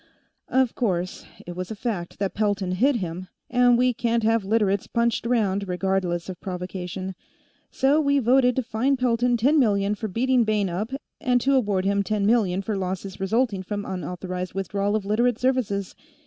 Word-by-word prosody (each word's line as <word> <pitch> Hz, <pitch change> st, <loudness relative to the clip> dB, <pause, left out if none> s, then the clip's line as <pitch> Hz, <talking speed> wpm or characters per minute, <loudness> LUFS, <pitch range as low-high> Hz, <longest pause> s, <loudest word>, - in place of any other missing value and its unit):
Of 260 Hz, -2 st, +2 dB
course, 185 Hz, -6 st, -2 dB, 0.2 s
it 175 Hz, -, -7 dB
was 185 Hz, 0 st, -5 dB
a 220 Hz, -, -5 dB
fact 200 Hz, -6 st, -4 dB
that 195 Hz, -1 st, -2 dB
Pelton'd 200 Hz, -3 st, 0 dB
hit 270 Hz, +6 st, +3 dB
him, 185 Hz, -3 st, -4 dB, 0.2 s
and 245 Hz, -1 st, +5 dB
we 250 Hz, 0 st, +3 dB
can't 235 Hz, 0 st, 0 dB
have 225 Hz, -1 st, +2 dB
Literates 200 Hz, -1 st, +1 dB
punched 235 Hz, -1 st, 0 dB
around, 200 Hz, -5 st, +1 dB
regardless 180 Hz, -1 st, -1 dB
of 185 Hz, -1 st, -7 dB
provocation. 185 Hz, 0 st, -5 dB, 0.6 s
So 280 Hz, +4 st, +2 dB
we 280 Hz, -1 st, +2 dB
voted 250 Hz, 0 st, +4 dB
to 260 Hz, -, 0 dB
fine 240 Hz, +5 st, 0 dB
Pelton 245 Hz, -1 st, +2 dB
ten 280 Hz, +7 st, +3 dB
million 205 Hz, -4 st, +2 dB
for 220 Hz, +1 st, -4 dB
beating 250 Hz, +5 st, +2 dB
Bayne 210 Hz, -3 st, +1 dB
up, 210 Hz, +8 st, -3 dB, 0.3 s
and 250 Hz, -3 st, +2 dB
to 275 Hz, +3 st, +2 dB
award 205 Hz, -8 st, +1 dB
him 200 Hz, +1 st, +2 dB
ten 205 Hz, 0 st, -1 dB
million 200 Hz, -4 st, +2 dB
for 210 Hz, +1 st, -2 dB
losses 190 Hz, 0 st, -4 dB
resulting 205 Hz, +1 st, 0 dB
from 205 Hz, +2 st, -4 dB
unauthorized 180 Hz, 0 st, -5 dB
withdrawal 200 Hz, +1 st, -1 dB
of 210 Hz, -2 st, -2 dB
Literate 230 Hz, +3 st, +2 dB
services. 245 Hz, -7 st, 0 dB
210 Hz, 175 wpm, -24 LUFS, 190-240 Hz, 0.6 s, and